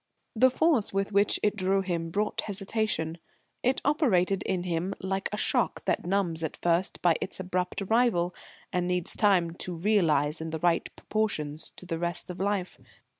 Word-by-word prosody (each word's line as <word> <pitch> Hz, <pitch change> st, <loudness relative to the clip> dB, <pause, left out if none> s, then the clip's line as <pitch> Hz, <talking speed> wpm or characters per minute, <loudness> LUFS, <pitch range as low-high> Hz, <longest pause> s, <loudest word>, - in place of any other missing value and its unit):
The 255 Hz, +4 st, +6 dB
force 285 Hz, -4 st, +2 dB
with 195 Hz, +1 st, -1 dB
which 200 Hz, 0 st, +3 dB
it 210 Hz, 0 st, +2 dB
drew 195 Hz, -1 st, +1 dB
him 170 Hz, -3 st, -2 dB
brought 210 Hz, +5 st, -1 dB
hesitation. 195 Hz, -5 st, -2 dB, 0.4 s
It 255 Hz, +2 st, +1 dB
operated 200 Hz, -, +2 dB
in 185 Hz, -2 st, 0 dB
him 180 Hz, +2 st, -2 dB
like 190 Hz, +1 st, -2 dB
a 210 Hz, -, -3 dB
shock -, -, 0 dB
that -, -, 0 dB
numbs 175 Hz, -4 st, 0 dB
at 160 Hz, -, -3 dB
first 175 Hz, +2 st, 0 dB
by 175 Hz, -2 st, +5 dB
its -, -, -3 dB
abrupt 180 Hz, +1 st, -2 dB
arrival, 195 Hz, -5 st, +2 dB, 0.4 s
and 180 Hz, -1 st, 0 dB
needs 180 Hz, -1 st, +1 dB
time 185 Hz, -5 st, +3 dB
to 180 Hz, -, -4 dB
realise 165 Hz, -6 st, +2 dB
in 160 Hz, -, -4 dB
the 160 Hz, -, -3 dB
right 170 Hz, +1 st, +1 dB
proportions 155 Hz, -9 st, -2 dB
to -, -, -10 dB
the 165 Hz, -2 st, -3 dB
rest 175 Hz, +1 st, -2 dB
of 180 Hz, -, -9 dB
life. 195 Hz, -2 st, -1 dB
185 Hz, 175 wpm, -28 LUFS, 170-205 Hz, 0.4 s, The